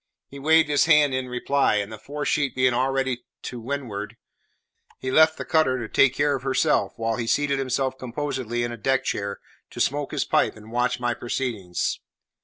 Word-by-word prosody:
He 140 - -10
waved 160 +2 +4
his 145 -1 +3
hand 150 -4 +5
in 130 -1 -2
reply, 130 0 +1
and 105 0 -1
the 110 - -8
fore 145 +4 -5
sheet 140 -4 0
being 130 -1 +3
already 130 0 0 0.2
to 125 - -6
windward, 115 -4 -5 0.8
he 130 - -4
left 160 +2 +5
the - - -5
cutter 155 -5 +2
to 120 -3 -4
take 130 +3 +3
care 145 0 +2
of 135 - -5
herself, 135 +3 +1
while 115 0 -1
he 115 -1 -3
seated 140 +2 +1
himself 130 0 -1
composedly 125 -2 -3
in 120 - -2
a 120 - -6
deck 135 +3 +1
chair 100 -5 -3 0.3
to - - -10
smoke 145 0 0
his - - -1
pipe - - +2
and 110 +1 -13
watch 125 +1 0
my 120 -1 0
proceedings. 115 -7 -3
130 Hz, 195 wpm, -24 LUFS, 120-140 Hz, 0.8 s, hand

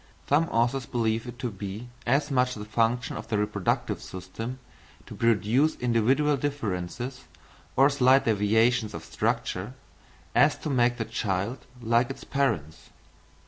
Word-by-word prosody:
Some 150 +4 +4
authors 120 +2 +1
believe 115 0 -1
it 120 0 -8
to 120 -1 -3
be 100 +4 -6 0.2
as 140 +4 +2
much 125 -1 +2
the 105 -1 -7
function 115 +2 0
of - - -7
the 110 -2 0
reproductive 105 -2 -1
system 110 +7 -6 0.5
to - - -10
produce 115 - +2
individual 125 +5 +2
differences, 125 -2 -4 0.5
or 135 +2 +6
slight 135 -1 +4
deviations 110 +1 +2
of - - -7
structure, - - -2 0.6
as - - +4
to 150 - -4
make 120 -2 +2
the 115 - -2
child 110 +1 -2 0.2
like 115 +2 +2
its 135 - -7
parents. 85 - -2
120 Hz, 140 wpm, -27 LUFS, 105-130 Hz, 0.6 s, or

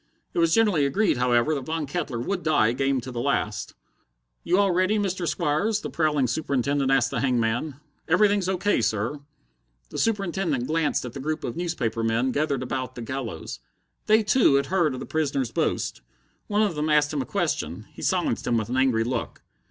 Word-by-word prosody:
It - - -1
was 165 -1 +3
generally 205 -6 +3
agreed, 200 - +1
however, 125 +4 +2
that 140 -4 -4
Von 160 -1 -2
Kettler 140 -5 -3
would 180 +10 -2
die 145 -9 +3
game 135 +1 0
to 130 +2 -7
the 120 -1 -3
last. - - -1 0.7
"You 180 - +2
all 200 -1 +3
ready, 185 +4 +2
Mr. 190 -4 -1
Squires?" 200 +10 0
the - - -5
prowling 150 -4 +1
Superintendent 140 0 0
asked 135 -2 +3
the 130 - -1
hangman. 125 +2 0 0.3
"Everything's 200 +2 +3
O. 190 - 0
K., 200 -6 +1
sir." 110 +6 -1 0.7
The - - -4
Superintendent 190 - 0
glanced 155 -2 0
at 120 - -7
the 135 - -7
group 155 +3 -3
of 120 - -4
newspaper 160 -10 -2
men 115 +3 +1
gathered 140 -2 0
about 130 0 -4
the 120 - -6
gallows. 120 - -5 0.5
They, 215 +1 +5
too, 215 - +4
had 140 0 +2
heard 170 -5 +1
of - - -6
the - - -6
prisoner's 140 -6 -1
boast. - - -1 0.5
One 210 +1 +2
of 205 -4 +1
them 150 0 -2
asked 150 0 +3
him 145 - 0
a - - -4
question. 110 - -2
He - - -11
silenced - - 0
him 120 -1 +2
with 110 0 -2
an 125 - -1
angry 130 -4 +3
look. 120 0 -4
145 Hz, 195 wpm, -25 LUFS, 125-175 Hz, 0.7 s, They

